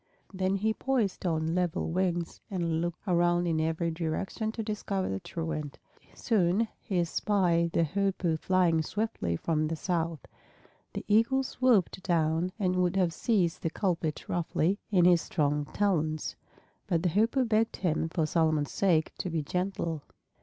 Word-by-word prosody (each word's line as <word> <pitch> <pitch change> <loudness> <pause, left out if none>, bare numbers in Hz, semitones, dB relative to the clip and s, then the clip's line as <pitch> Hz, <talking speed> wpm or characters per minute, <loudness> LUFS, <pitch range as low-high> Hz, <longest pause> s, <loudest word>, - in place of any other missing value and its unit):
Then 190 0 0
he 215 +3 +1
poised 225 -8 -1
on 160 -1 0
level 175 -2 -1
wings 175 -1 -1
and 170 -4 -1
looked 175 0 -4
around 175 -1 +3
in 160 -2 +1
every 160 +1 0
direction 175 +7 -2
to 225 - -4
discover 205 -3 -2
the 95 - -2
truant. 160 - -5 0.4
Soon 210 0 +2
he 190 - -3
espied 170 -1 +1
the 170 - +3
Hoopoe 185 -1 0
flying 175 -3 +2
swiftly 205 - -2
from 155 - 0
the 165 - -2
south. 165 -3 -2 0.7
The - - -5
Eagle 230 +6 +3
swooped 245 -8 +2
down 165 0 +1
and 185 -4 0
would 180 0 +1
have 180 -4 +2
seized 180 -7 +1
the 165 - 0
culprit 165 -4 -2
roughly 175 +3 0
in 180 -5 +4
his 175 -2 +5
strong 150 -2 0
talons, 155 -5 -1 0.5
but 170 -3 0
the 180 - +2
Hoopoe 225 - +2
begged 225 0 +1
him 165 -3 -1
for 160 -1 0
Solomon's 155 -2 +1
sake 170 -5 +2
to 185 - -2
be 160 -2 -1
gentle. 180 -1 -2
175 Hz, 155 wpm, -29 LUFS, 160-195 Hz, 0.7 s, his